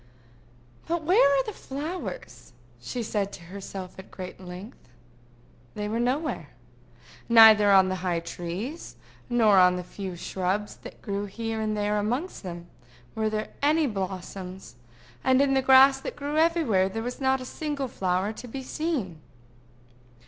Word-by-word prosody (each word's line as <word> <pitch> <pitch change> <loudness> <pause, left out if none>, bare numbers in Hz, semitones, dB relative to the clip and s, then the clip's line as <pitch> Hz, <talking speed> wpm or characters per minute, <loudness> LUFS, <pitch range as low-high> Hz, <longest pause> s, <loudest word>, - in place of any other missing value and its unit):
"But 335 -1 -1
where 360 +7 +5
are 275 -1 +3
the 430 - -6
flowers?" 270 - -7 0.3
she 235 - -4
said 205 -2 -2
to 175 - -10
herself 190 +1 -8
at 185 -1 -9
length. 185 - -10 0.9
They 210 0 -3
were 220 +2 -2
nowhere. 265 +6 -1 0.8
Neither 220 -3 +8
on 190 -1 +6
the 185 - -2
high 175 -2 -1
trees, 175 - -6 0.3
nor 220 -5 +5
on 180 0 +6
the 180 - -4
few 190 0 -7
shrubs 190 +4 -2
that - - -12
grew 200 0 -2
here 225 +2 -4
and 215 -1 -1
there 210 0 0
amongst 245 - -2
them, 175 -2 -7 0.5
were 220 0 0
there 215 0 -3
any 305 +2 +3
blossoms; 190 - -5 0.5
and 260 0 +4
in 275 -1 +3
the 265 - +3
grass 265 +1 +7
that - - -6
grew 290 +1 -4
everywhere 310 - +3
there 225 +3 -4
was 245 +3 -5
not 265 0 +2
a 255 - -7
single 290 0 -3
flower 190 -1 -1
to 245 - -9
be 265 +3 -6
seen. 255 - -3
215 Hz, 150 wpm, -26 LUFS, 190-265 Hz, 0.9 s, Neither